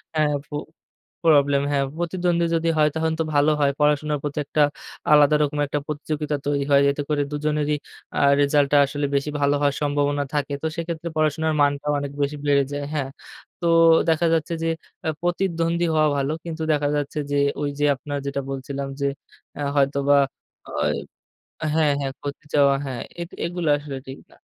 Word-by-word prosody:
হ্যাঁ 150 -1 +2
ফু 145 - -7 0.7
প্রবলেম 145 -3 +5
হ্যাঁ। 140 -1 +2 0.2
প্রতিদ্বন্দ্বী 175 0 0
যদি 165 0 +1
হয় 150 0 +4
তাহলে 160 0 0
তো - - 0
ভালো 145 +2 +4
হয়। 140 -1 +3
পড়াশোনার 150 0 +2
প্রতি 145 0 -4
একটা 150 - 0 0.5
আলাদা 150 0 +6
রকম 145 0 -2
একটা 145 - -1
প্রতিযোগিতা 150 0 -2
তৈরি 140 -1 0
হয়। 140 - +6
এতে 145 +1 -3
করে 150 -1 +1
দুজনেরই 150 0 0 0.4
আ - - +2 0.2
রেসাল্টটা 145 0 +3
আসলে 145 +1 -3
বেশি 140 +2 0
ভালো 140 0 +3
হওয়ার 140 -1 +2
সম্ভাবনা 145 0 +1
থাকে। 145 0 -1
তো 160 - +1
সেক্ষেত্রে 170 0 -4
পড়াশোনার 155 +1 +1
মানটাও 145 +1 +1
অনেক 140 -1 -4
বেশি 145 +1 -2
বেড়ে 140 -1 +4
যায়। 145 0 -3
হ্যাঁ। 135 -3 -1 0.5
তো - - -2 0.4
দেখা 165 +1 +2
যাচ্ছে 165 +1 0
যে, - - 0 0.5
প্রতিদ্বন্দ্বী 170 -1 0
হওয়া 155 0 +4
ভালো। 140 +1 0
কিন্তু 160 -1 -4
দেখা 145 -1 +1
যাচ্ছে 145 +1 -3
যে, - - +1 0.3
ওই 145 - 0
যে 145 - +3
আপনার 145 +2 -5
যেটা 140 0 -2
বলছিলাম 135 +1 -4
যে, - - +1 0.5
এ - - -3
হয়তোবা 140 0 +3 0.5
ওয় - - 0 0.8
হ্যাঁ, 155 -2 +3
হ্যাঁ, 135 -1 -3
ক্ষতি 145 +1 -6
চাওয়া 140 -1 +5
হ্যাঁ 130 -3 -4 0.2
এ - - 0 0.2
এগুলো 175 -1 -3
আসলে 145 -2 -7
ঠিক 135 +1 -8
না। - - -19
145 Hz, 170 wpm, -23 LUFS, 140-155 Hz, 0.8 s, আলাদা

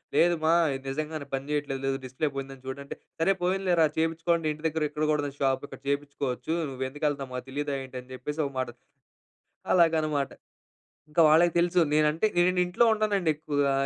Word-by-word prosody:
లేదు 175 0 +5
మా, 165 - +5 0.2
ఇది 135 - -7
నిజంగానే 155 +1 -4
పని 135 +1 -5
చేయట్లేదు 140 -2 -2
లేదు 135 - 0
డిస్ప్లే 130 +4 -2
పోయిందని 135 -1 -6
చూడంటే 140 +1 -6 0.2
సరే 180 +4 +4
పోయిందిలేరా 180 -3 +3
చేపించుకోండి 165 +1 +1
ఇంటి 155 +2 -11
దగ్గర 160 0 -1
ఇక్కడ 150 +1 -3
కూడా 150 -1 +2
ఉంది 140 0 -6
షాప్ 135 0 +1
ఇక్కడ - - -11
చేపించుకోవచ్చు. 140 -1 -2 0.2
"నువ్వు 130 -1 -4
ఎందుకు 145 +3 -4
వెళ్తనావో 140 -3 -3
మాకు 125 - -5
తెలియదా 145 0 -2
ఏంటి?" 130 -1 -9
అని 130 +1 -18
చెప్పేసి 150 +5 -3
ఒక 140 - -10
మాట. 130 - 0 1.1
అలాగనమాట. 155 -5 +2 0.8
ఇంకా 165 +2 +3
వాళ్ళకి 170 +2 +5
తెలుసు 175 +1 +3
నేను 155 0 +4
అంటే 165 +7 0
నేను 180 +1 +3
ఇంట్లో 180 +7 +2
ఉంటానండి 205 -6 +1
ఎక్కువగా 145 -2 0
150 Hz, 180 wpm, -27 LUFS, 135-165 Hz, 1.1 s, లేదు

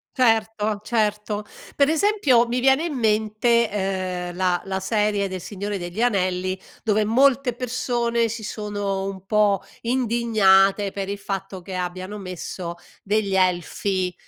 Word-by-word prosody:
Certo, 220 -4 +1
certo. 210 -2 -1 0.3
Per 280 0 +3
esempio 315 - +3
mi 240 +1 -1
viene 270 +4 +4
in 335 -4 -3
mente, 220 0 +2
ehm, 185 -3 -2
la 180 -1 +1
la 190 0 -3
serie 210 -1 0
de 185 - -5
Il 185 - -6
Signore 205 +2 -4
degli 175 +4 -5
Anelli, 185 -4 0 0.2
dove, 215 -1 +2
molte 260 +2 +3
persone 240 -1 0
si 225 0 -6
sono 205 -2 -3
un 195 -1 -6
po' 205 -1 +2 0.2
indignate, 220 -5 +3
per 195 0 -4
il 200 +1 -3
fatto 195 -1 -5
che 185 +1 -7
abbiano 185 +3 -4
messo 180 -2 -6 0.3
degli 205 -1 0
elfi, 185 +1 0
210 Hz, 140 wpm, -23 LUFS, 190-235 Hz, 0.3 s, viene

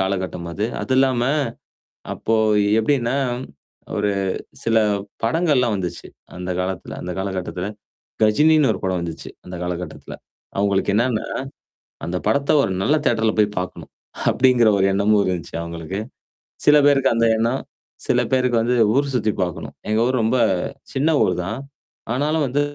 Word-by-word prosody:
காலகட்டம் 95 -3 -2
அது. 105 +5 -2 0.2
அது 130 - -2
இல்லாம 130 -2 +3 0.9
அப்போ 115 - -1 0.4
எப்டின்னா, 120 +1 +1 0.8
ஒரு 105 0 +1 0.5
சில 115 0 +2 0.5
படங்கள்லாம் 125 -3 +2
வந்துச்சு 90 -3 -5 0.3
அந்த 90 0 -5
காலத்துல 95 0 -4
அந்த 90 - -4
காலகட்டத்துல. 95 -1 -3 0.6
கஜினின்னு 150 +7 +4
ஒரு - - -6
படம் 95 -2 0
வந்துச்சு. 85 -2 -6
அந்த 90 - -8
காலகட்டத்துல. 90 0 -5 0.5
அங்களுக்கு 100 0 +1
என்னன்னா? 115 0 +1 0.8
அந்த 90 +1 -2
படத்த 140 0 +2
ஒரு 95 - -1
நல்ல 150 +9 +3
தியட்டர்ல 110 -2 +2
போய் 105 0 +2
பாக்கணும், 90 - -7 0.4
அப்டிங்கிற 125 -3 +4
ஒரு 95 - +3
எண்ணமும் 100 +1 +3
இருந்துச்சு 90 -3 -3
அவங்களுக்கு. 85 +3 -5 0.7
சில 150 0 +7
பேருக்கு 135 -2 +4
அந்த 115 0 +3
எண்ணம். 115 +4 0 0.5
சில - - +3
பேருக்கு 125 -2 +2
வந்து 125 +2 +1 0.2
ஊர் 140 0 +1
சுத்தி 110 -3 +1
பார்கணும். 90 -2 -3 0.2
எங்க 110 - +2
ஊர் 130 -1 +1
ரொம்ப 115 +4 +2 0.6
சின்ன 140 +4 +1
ஊர் 90 - +2
தான். 110 +7 -4 0.5
ஆனாலும் 150 +3 +1
வந்து 140 +4 0
110 Hz, 135 wpm, -21 LUFS, 95-130 Hz, 0.9 s, சில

